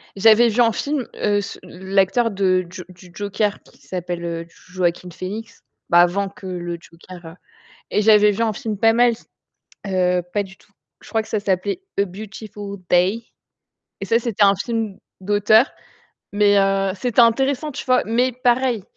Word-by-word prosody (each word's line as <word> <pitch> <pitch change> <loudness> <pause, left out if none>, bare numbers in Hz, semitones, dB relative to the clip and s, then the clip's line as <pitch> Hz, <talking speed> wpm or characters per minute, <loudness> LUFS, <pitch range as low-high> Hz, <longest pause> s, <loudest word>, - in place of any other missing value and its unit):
j'avais 225 +4 +6
vu 235 +3 +1
en 230 -1 +4
film, 280 0 -3
heu, 205 -1 0
s 200 - -4
heu, - - -13
l'acteur 195 +5 +1
de 185 -2 +1
J 180 0 -9
du 180 -1 -16
Joker 205 +1 -2
qui - - -22
s'appelle, 175 -1 -5
heu, 170 -1 -4 0.2
Joaquin 180 -1 -1
Phoenix, 205 +6 -7 0.3
bah, 170 - +5
avant 195 +3 +1
que 195 -1 -15
le 175 -1 -4
Joker, 175 +1 -14
heu 165 +2 -10 0.6
et 210 - +1
j'avais 210 -1 +6
vu 215 +3 -2
un 225 - +1
film 215 -2 -4
pas 225 +1 +4
mal 240 +1 +4
s 230 - -11 0.6
heu, 180 -1 +1
pas 205 - +1
du 195 0 -13
tout. - - -27 0.3
Je - - -15
crois 225 - 0
que 220 - -13
ça 215 - -1
s'appelait 200 - -1 0.2
A 200 - +3
Beautiful 200 +1 -8
Day 185 +6 +2 0.8
et - - -3
ça, 230 - +2
c'était 225 -4 +1
un 200 0 +5
film 220 -1 -3 0.2
d'auteur. 205 +5 +3 0.6
Mais, 205 0 +4
heu, 195 -1 +1
c'était 240 +4 +1
intéressant, 270 +5 +2
tu 280 - -6
vois, 255 -1 +3
mais 245 +4 +1
pareil, 245 -2 +1
205 Hz, 180 wpm, -21 LUFS, 185-225 Hz, 0.8 s, j'avais